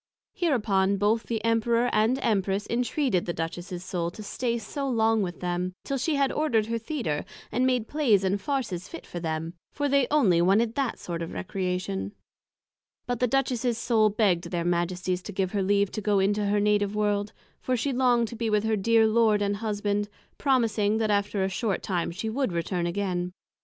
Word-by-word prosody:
Hereupon 210 - +1
both 210 +3 +1
the 225 -2 -2
Emperor 230 +1 +2
and 220 +4 +3
Empress 200 -1 +1
intreated 245 - 0
the 175 - -1
Duchess's 175 +2 -5
Soul 175 -2 -2
to 215 +5 -10
stay 235 +3 -2
so 270 +6 -4
long 225 -2 +2
with 180 -3 -4
them, 180 +1 -2
till 275 -1 -2
she 300 +4 0
had 275 -1 +2
ordered 240 -8 +1
her 230 +1 -2
Theatre, 225 - -2 0.3
and 250 +4 +2
made 250 -4 +1
Playes 245 -10 +2
and 195 +1 0
Farses 210 -8 -2
fit - - -9
for 175 - -6
them; 160 0 -3 0.2
for 290 -1 -1
they 275 -2 +3
onely 205 - +4
wanted 215 +6 +3
that 270 -2 -1
sort 170 -1 -5
of 165 - -5
Recreation: 180 - -3 0.9
but 245 -1 -2
the 250 - +2
Duchess's 250 -2 0
Soul 220 -2 +3
begg'd 200 -5 +1
their 170 -2 -2
Majesties 180 +1 0
to 205 - -7
give 190 -1 -1
her 205 - 0
leave 200 0 +2
to 215 - -4
go 205 0 +2
into 205 +2 +1
her 205 +1 +2
Native 205 0 +1
World; 205 0 0 0.3
for 255 -1 -1
she 270 +4 -1
long'd 245 -2 +3
to 235 - -7
be 230 -1 -1
with 210 -1 +2
her 220 0 +1
dear 225 +2 +4
Lord 220 -1 +3
and 205 0 0
Husband, 205 -1 -1 0.3
promising, 220 -6 +2
that 220 -1 +1
after 200 -1 +1
a - - +1
short 195 +1 -2
time 175 -3 -1
she 195 +6 -5
would 255 0 -1
return 170 +1 -1
again. 180 -1 -2
210 Hz, 195 wpm, -27 LUFS, 185-235 Hz, 0.9 s, onely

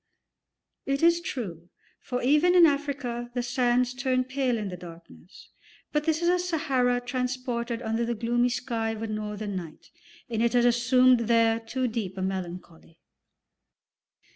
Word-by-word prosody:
It 275 +2 0
is 340 0 +5
true, 180 - -6 0.3
for 250 -1 -4
even 300 +7 +4
in 350 -2 +8
Africa 280 -5 -1
the 245 - 0
sands 250 0 +1
turn 255 0 0
pale 260 -2 -1
in 210 -3 -4
the 180 - -6
darkness, 170 +1 -14 0.4
but 300 0 0
this 320 +1 0
is - - +2
a 360 +1 +3
Sahara 275 -8 +1
transported 245 -1 -3
under 225 +1 -1
the 235 0 -1
gloomy 240 +2 +1
sky 230 -2 -2
of 220 0 -6
a - - -2
northern 210 -1 -4
night, 170 -4 -8 0.4
and 230 -2 -2
it 235 +1 +2
has 245 -1 +4
assumed 245 0 +4
there 230 -1 +3
too 250 +3 -2
deep 215 -5 -4
a 190 - -2
melancholy. 180 -3 -6
240 Hz, 155 wpm, -27 LUFS, 220-260 Hz, 0.4 s, in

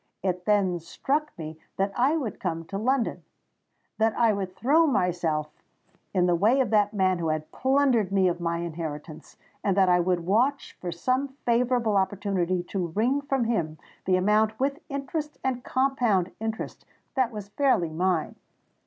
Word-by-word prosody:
It 180 -1 -1
then 195 -4 +2
struck 285 - -2
me 155 -1 -7 0.2
that 195 +1 +1
I 275 +6 +3
would 240 -10 -4
come 165 -3 -3
to 195 +4 -5
London—that 225 -2 -3
I 230 -2 +4
would 190 -2 -4
throw 310 +9 +4
myself 170 - 0 0.6
in 180 -2 +2
the 175 - +3
way 215 +10 +3
of 260 - +1
that 205 -1 +3
man 185 -3 +1
who 165 - -1
had 155 0 -2
plundered 260 -7 +2
me 190 -1 +3
of 175 -1 -1
my 170 0 0
inheritance—and 165 +3 -5
that 190 -2 +5
I 180 0 +5
would 175 0 +1
watch 250 +9 +1
for 175 - -3
some 255 +11 0 0.2
favourable 235 -3 +2
opportunity 190 -2 0
to 180 -1 -3
wring 235 - +1
from 270 -3 0
him 170 -10 -1 0.3
the 185 - +3
amount 215 +3 +2
with 275 +3 0
interest 290 +2 -4
and 255 -2 -1
compound 245 -9 +1
interest, 220 0 -4 0.3
that 260 -3 +1
was 210 -3 -7
fairly 210 - +2
mine. 175 0 0
200 Hz, 160 wpm, -26 LUFS, 175-250 Hz, 0.6 s, that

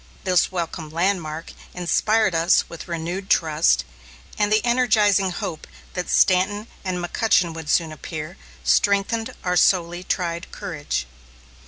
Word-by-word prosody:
This 185 -1 +2
welcome 170 -3 -4
landmark 165 -2 -2 0.2
inspired 200 +3 +2
us 165 +2 +3
with 170 - -9
renewed 175 +3 -4
trust; 155 - +3 0.5
and 210 0 0
the 215 +2 +3
energizing 220 -6 +3
hope 180 -3 -5 0.3
that 180 -1 -4
Stanton 200 +3 +3 0.2
and 185 -2 -2
McCutchen 175 -1 +1
would 160 -2 -7
soon 165 -1 +2
appear, 155 +2 -7 0.3
strengthened 225 +4 +1
our 180 -1 0
sorely 175 -1 +3
tried 170 -1 -3
courage. 160 - -4
180 Hz, 125 wpm, -22 LUFS, 165-200 Hz, 0.5 s, us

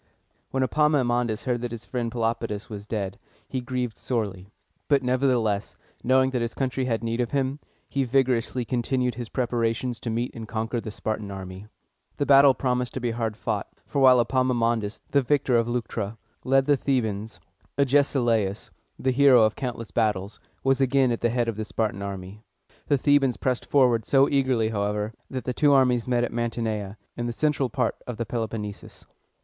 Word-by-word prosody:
When 135 0 0
Epaminondas 125 -6 +1
heard 120 -2 -1
that 120 - -3
his 115 0 -8
friend 120 -2 -3
Pelopidas 115 -2 -2
was 105 0 -7
dead, 100 -4 -3 0.3
he 130 - -3
grieved 125 -2 -3
sorely; 100 -6 -3 0.4
but 140 -2 +3
nevertheless, 125 -5 +1 0.3
knowing 130 +1 +3
that 125 -2 -1
his 115 0 -3
country 130 -1 -1
had 115 -3 -1
need 115 +1 -1
of 120 - -1
him, 135 0 -1 0.3
he 140 - 0
vigorously 125 -1 +1
continued 125 +1 0
his 120 0 -6
preparations 120 -1 -1
to 120 - -4
meet 120 +2 -1
and 115 -1 -7
conquer 115 +1 -2
the 110 - -6
Spartan 110 0 -4
army. 95 +1 -8 0.5
The 145 - 0
battle 140 -1 +7
promised 125 -1 -1
to - - -1
be 120 -1 -1
hard 115 -2 -3
fought; - - -2 0.2
for 140 - -1
while 130 -1 +7
Epaminondas, 120 -3 +1
the 140 - +4
victor 135 -1 +1
of 115 0 +3
Leuctra, 115 -3 -3 0.3
led 135 0 +3
the 145 0 +3
Thebans, 110 -6 -1 0.4
Agesilaus, 125 -7 +2 0.3
the 130 - 0
hero 130 -3 +6
of 110 0 +2
countless 115 -6 -5
battles, 105 -1 -1 0.2
was 135 0 +2
again 135 -1 +3
at 115 - -2
the 120 - +2
head 120 0 0
of 115 -3 -2
the 110 - -2
Spartan 105 -2 -2
army. 100 +1 -6 0.5
The 145 - +3
Thebans 135 -2 +3
pressed 125 -2 -1
forward 125 -5 +3
so 135 0 +5
eagerly, 130 -5 +1
however, 105 0 -2 0.2
that 130 -1 -4
the 125 - -2
two 145 +3 +3
armies 125 -3 +3
met 120 -1 +2
at 120 - -2
Man 120 0 0
ti 120 - -6
ne´a, 105 -3 -3 0.2
in 120 0 -3
the - - -2
central 145 -1 0
part - - -1
of 125 -3 -5
the 115 - -2
Peloponnesus. 110 -3 -5
120 Hz, 180 wpm, -25 LUFS, 110-130 Hz, 0.5 s, battle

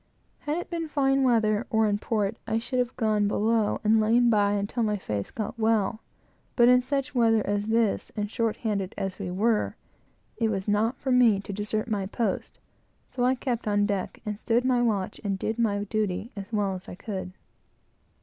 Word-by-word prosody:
Had 300 +2 -2
it 350 - -4
been 335 -1 -2
fine 275 -2 +2
weather, 225 -3 +2
or 220 -3 +3
in 205 0 0
port, 215 -1 -1
I 220 - +1
should 250 +2 -2
have 245 0 -1
gone 215 -3 +1
below 215 +1 +1
and 220 +1 +4
lain 235 +2 +4
by 205 -2 +3
until 205 +4 -1
my 210 -2 +1
face 105 - -4
got 225 +1 -5
well; 220 -1 +1 0.6
but 240 -1 +6
in 250 0 +6
such 275 +2 -2
weather 225 -3 +3
as 205 +1 -1
this, 225 -2 +1
and 210 -1 -1
short 225 0 -1
handed 200 -4 -2
as 195 -2 -3
we 195 -3 -4
were, 210 +4 +1 0.6
it 225 -2 +1
was 195 -2 -3
not 220 +5 +1
for 265 - -3
me 240 -5 +5
to 200 - -7
desert 210 +2 -2
my 205 -4 -1
post; 210 -1 -2 0.5
so 245 - -2
I 255 +1 +3
kept 245 -3 -3
on 205 0 +2
deck, 200 -3 -3
and 210 -1 -4
stood 240 +2 +1
my 250 -2 +3
watch 210 -5 -1
and 200 -2 -1
did 220 +4 -3
my 205 -3 +1
duty 210 +1 -2
as 200 +1 -7
well 205 -3 0
as 185 0 -8
I - - -7
could. 190 -2 -6
220 Hz, 200 wpm, -27 LUFS, 205-235 Hz, 0.6 s, but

